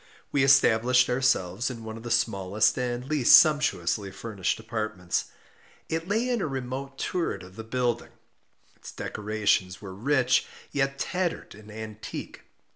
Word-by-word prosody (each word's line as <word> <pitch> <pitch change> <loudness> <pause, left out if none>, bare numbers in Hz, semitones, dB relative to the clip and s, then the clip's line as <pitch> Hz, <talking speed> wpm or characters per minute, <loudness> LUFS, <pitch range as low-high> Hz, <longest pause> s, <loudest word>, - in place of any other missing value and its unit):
We 140 - +2
established 125 -2 +4
ourselves 120 -5 +1
in 115 -3 -7
one 110 0 -6
of 115 - -9
the 120 - -7
smallest 105 -3 +2
and 125 -1 -2
least 145 -4 +7
sumptuously 110 - +2
furnished 100 -1 -3
apartments. 110 -5 -3 0.6
It 165 +1 -2
lay 220 +5 +1
in 245 -3 0
a - - -1
remote 135 0 -5
turret 165 - -2
of 90 +1 -14
the 110 - -7
building. 120 +1 -1 0.6
Its - - -11
decorations 105 -3 -1
were 95 -3 -8
rich, 125 +4 +2 0.2
yet 135 -1 0
tattered 180 +3 -2
and 105 +1 -14
antique. 110 0 -8
120 Hz, 140 wpm, -27 LUFS, 105-135 Hz, 0.6 s, least